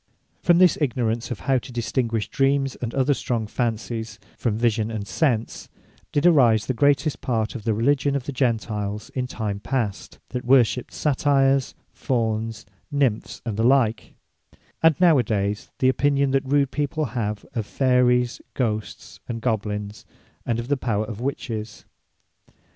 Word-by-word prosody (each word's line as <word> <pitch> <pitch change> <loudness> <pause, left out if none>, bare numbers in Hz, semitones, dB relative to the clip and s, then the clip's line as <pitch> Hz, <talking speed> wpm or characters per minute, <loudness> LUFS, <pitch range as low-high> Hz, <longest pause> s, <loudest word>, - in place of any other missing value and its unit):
From 175 -1 +4
this 180 -3 +5
ignorance 120 -4 0
of 110 -8 -5
how 135 -1 +2
to 125 - -11
distinguish 115 -2 -1
Dreams, 135 -1 +1
and 120 -2 -2
other 135 +1 +3
strong 120 -4 -2
Fancies, 115 0 -3 0.2
from 110 -3 -1
vision 110 -2 +1
and 105 -3 -5
Sense, 120 -6 -1 0.4
did 145 - +1
arise 120 -11 +5
the 130 - -1
greatest 145 +4 +2
part 115 -4 -1
of 115 -4 -8
the 110 - +2
Religion 140 +4 +2
of 140 - -1
the 140 - -5
Gentiles 110 -5 -2
in 125 -1 -2
time 105 -5 -4
past, 115 -4 -3
that 125 - -4
worshipped 125 -1 +3
Satyres, 135 -2 +2 0.2
Fawnes, 115 -3 -2 0.3
nymphs, 135 -7 -1
and 110 -3 -3
the 110 - +1
like; 120 -3 +2 0.7
and 160 -3 +4
now 170 -6 +6
adayes 105 -3 -1
the 130 - +3
opinion 140 0 +2
than 135 0 +1
rude 140 0 +2
people 150 +1 -1
have 105 -3 -3
of 110 -3 -3
Fayries, 125 -2 +2
Ghosts, 105 - -3
and 115 -1 -3
Goblins; 105 -3 -3 0.4
and 115 - +1
of 120 0 -4
the 145 +1 +1
power 110 -4 -1
of 110 0 -7
Witches. 115 -5 -4
120 Hz, 155 wpm, -23 LUFS, 110-135 Hz, 0.7 s, now